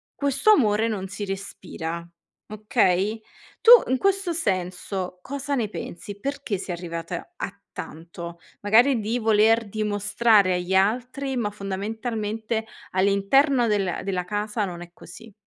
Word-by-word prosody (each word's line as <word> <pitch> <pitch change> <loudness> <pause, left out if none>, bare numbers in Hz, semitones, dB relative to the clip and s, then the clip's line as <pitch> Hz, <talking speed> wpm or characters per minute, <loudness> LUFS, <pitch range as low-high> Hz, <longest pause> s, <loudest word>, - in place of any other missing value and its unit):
questo 280 +8 +2
amore 220 - +3
non 195 -4 -3
si 205 +1 -5
respira, 170 -3 -6 0.4
okay, 215 -1 +1 0.4
tu 470 - +7 0.2
in 260 - +3
questo 390 0 +1
senso, 185 - -3
cosa 280 +3 -4
ne 230 -5 0
pensi? 205 +1 -7
Perché 275 -6 -3
sei 180 -1 -5
arrivata 170 -1 -6
a - - -4 0.2
tanto? 170 +1 -8 0.2
Magari 235 +5 +4
di 225 +4 -1
voler 220 0 +3
dimostrare 210 -1 +2
agli 180 +1 -2
altri, 250 +7 +1
ma 210 -3 0
fondamentalmente 220 +2 -3 0.3
all'interno 215 +7 +3
della 195 -4 0
della 185 -2 -2
casa 210 +2 -2
non 175 -2 -7
è 175 0 -10
così. 215 +6 -13
210 Hz, 130 wpm, -24 LUFS, 190-235 Hz, 0.4 s, tu